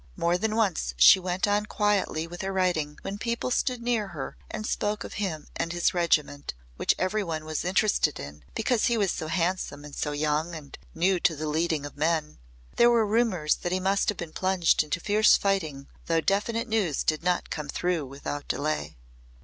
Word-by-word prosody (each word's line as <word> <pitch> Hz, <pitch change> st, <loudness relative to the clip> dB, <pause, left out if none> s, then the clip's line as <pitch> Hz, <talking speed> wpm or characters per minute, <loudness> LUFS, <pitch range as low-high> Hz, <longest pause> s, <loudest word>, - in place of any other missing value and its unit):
More 170 Hz, +1 st, +1 dB
than 215 Hz, +4 st, -1 dB
once 185 Hz, -, 0 dB
she 60 Hz, -, +8 dB
went 180 Hz, 0 st, -1 dB
on 205 Hz, +1 st, +1 dB
quietly 205 Hz, -7 st, 0 dB
with 175 Hz, +1 st, -8 dB
her 195 Hz, -, -2 dB
writing 175 Hz, -6 st, 0 dB
when 200 Hz, +1 st, -5 dB
people 235 Hz, +3 st, -2 dB
stood 250 Hz, -1 st, 0 dB
near 235 Hz, -4 st, 0 dB
her 155 Hz, -8 st, -6 dB
and 215 Hz, -, -5 dB
spoke 210 Hz, 0 st, -1 dB
of -, -, -8 dB
him 160 Hz, -7 st, -3 dB
and 165 Hz, 0 st, -2 dB
his 175 Hz, +1 st, +1 dB
regiment, 150 Hz, -, 0 dB, 0.2 s
which -, -, +1 dB
every 205 Hz, +3 st, 0 dB
one 160 Hz, -3 st, -4 dB
was 155 Hz, -1 st, -3 dB
interested 180 Hz, -4 st, +1 dB
in 70 Hz, +1 st, -9 dB
because 245 Hz, -4 st, +1 dB
he 235 Hz, -, +2 dB
was 200 Hz, -4 st, +2 dB
so 160 Hz, -, -4 dB
handsome 165 Hz, -4 st, -1 dB
and 145 Hz, -, -10 dB
so 150 Hz, -, -2 dB
young 150 Hz, +3 st, -1 dB
and 145 Hz, -3 st, -10 dB, 0.2 s
new 180 Hz, +2 st, +2 dB
to 170 Hz, -1 st, +2 dB
the 155 Hz, +1 st, -4 dB
leading 155 Hz, -1 st, 0 dB
of 145 Hz, -, -9 dB
men. 155 Hz, 0 st, 0 dB, 0.4 s
There 235 Hz, -, +6 dB
were 235 Hz, -2 st, +4 dB
rumours 205 Hz, -8 st, +2 dB
that 175 Hz, -, -4 dB
he 185 Hz, -, +1 dB
must 195 Hz, +1 st, +1 dB
have 210 Hz, -, -1 dB
been 165 Hz, -2 st, -6 dB
plunged 185 Hz, -2 st, +2 dB
into 150 Hz, +2 st, -2 dB
fierce 210 Hz, +4 st, +5 dB
fighting 160 Hz, -9 st, -1 dB, 0.2 s
though 165 Hz, -1 st, +2 dB
definite 225 Hz, +7 st, 0 dB
news 210 Hz, -, 0 dB
did 155 Hz, -1 st, 0 dB
not 180 Hz, +1 st, 0 dB
come 150 Hz, -2 st, -4 dB
through 175 Hz, -3 st, -1 dB
without 145 Hz, +2 st, -6 dB
delay. 155 Hz, -, -2 dB
175 Hz, 200 wpm, -27 LUFS, 155-205 Hz, 0.4 s, she